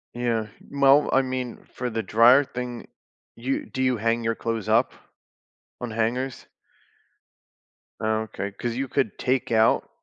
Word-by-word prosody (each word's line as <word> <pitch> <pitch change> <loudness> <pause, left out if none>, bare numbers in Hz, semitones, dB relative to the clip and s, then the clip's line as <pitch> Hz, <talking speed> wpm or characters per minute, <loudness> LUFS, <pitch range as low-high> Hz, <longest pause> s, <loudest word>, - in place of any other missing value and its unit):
Yeah, 115 -3 -1 0.2
well, 140 +1 +4
I 135 - +4
mean, 130 -2 -4
for 125 -1 -3
the 110 -1 -3
dryer 120 +7 +6
thing, 125 -2 -6 0.5
you 130 +4 -2
do 130 - -5
you 130 -2 +2
hang 115 +2 0
your 115 0 0
clothes 115 -2 -3
up? 115 +3 +3 0.9
On 120 - -3
hangers? 120 +4 -2 1.5
Oh, 110 0 0
okay, 100 -2 -5
'cause 115 +3 -4
you 135 +1 -2
could 135 +2 -1
take 130 -2 -1
out 110 0 +3
120 Hz, 145 wpm, -25 LUFS, 115-130 Hz, 1.5 s, dryer